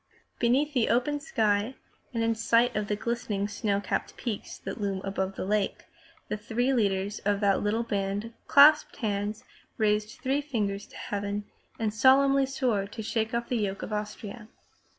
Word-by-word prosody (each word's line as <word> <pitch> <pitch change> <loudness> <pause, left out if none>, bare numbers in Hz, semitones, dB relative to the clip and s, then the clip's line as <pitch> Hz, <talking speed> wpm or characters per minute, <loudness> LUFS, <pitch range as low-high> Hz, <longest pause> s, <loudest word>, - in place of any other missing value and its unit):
Beneath 270 +5 +2
the 245 -5 +2
open 255 +5 +1
sky 215 -2 0 0.4
and 230 -3 -1
in 230 0 +2
sight 230 +2 +2
of 210 -1 -1
the 210 - 0
glistening 210 -2 -2
snow 205 -1 -1
capped 200 - -3
peaks 230 -5 -4
that 195 +2 -6
loom 200 -1 -1
up - - -9
about 190 0 -1
the - - -4
lake, 205 0 -1 0.4
the 210 - -2
three 240 +5 0
leaders 200 -3 0
of 205 0 0
that 200 -2 +3
little 215 +3 0
band 205 +1 -2
clasped 295 +2 +7
hands, 210 -2 -2 0.3
raised 210 0 0
three 270 +2 0
fingers 205 -8 -2
to - - -13
heaven, 205 0 -3 0.3
and 220 -2 -1
solemnly 270 +4 +5
swore 245 -7 0
to 220 +2 -7
shake 220 +1 -1
off 235 0 -1
the 245 - 0
yoke 200 -3 -2
of 215 - -5
Austria. 210 +1 -5
215 Hz, 170 wpm, -28 LUFS, 205-240 Hz, 0.4 s, clasped